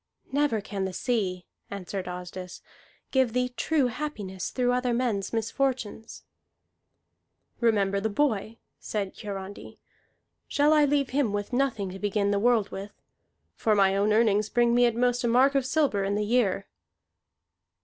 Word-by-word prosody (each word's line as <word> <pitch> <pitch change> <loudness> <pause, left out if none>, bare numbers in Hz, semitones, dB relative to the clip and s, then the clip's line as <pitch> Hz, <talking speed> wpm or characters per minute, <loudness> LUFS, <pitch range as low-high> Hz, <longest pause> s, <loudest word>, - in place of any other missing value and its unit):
"Never 280 -6 +1
can 195 -1 -4
the 190 - -4
sea," 190 -6 -1 0.2
answered 195 -1 -5
Asdis, 180 0 -7 0.5
"give 260 -4 +2
thee 250 0 +1
true 285 +3 +1
happiness 220 - -4
through 245 -1 0
other 250 -1 0
men's 225 -6 -1
misfortunes." 230 -1 -2 1.4
"Remember 200 -4 +2
the 220 +2 -1
boy," 220 -2 0 0.2
said 200 -3 -4
Hiarandi. 200 -1 -7 0.7
"Shall 295 +2 +3
I 300 -1 +5
leave 280 -1 +1
him 260 -6 +1
with 205 +4 -3
nothing 245 -7 0
to 190 - -8
begin 205 0 0
the 200 - +1
world 230 -2 +2
with? 200 +2 -7 0.6
For 215 -1 +1
my 195 -1 +4
own 205 +2 +2
earnings 215 -1 +3
bring 240 -1 +3
me 245 0 +5
at 235 - -1
most 245 +1 +1
a - - +2
mark 255 +4 +4
of 270 -2 +1
silver 270 -9 +1
in 200 +1 0
the 210 0 0
year." 205 -4 +1
220 Hz, 150 wpm, -27 LUFS, 200-250 Hz, 1.4 s, I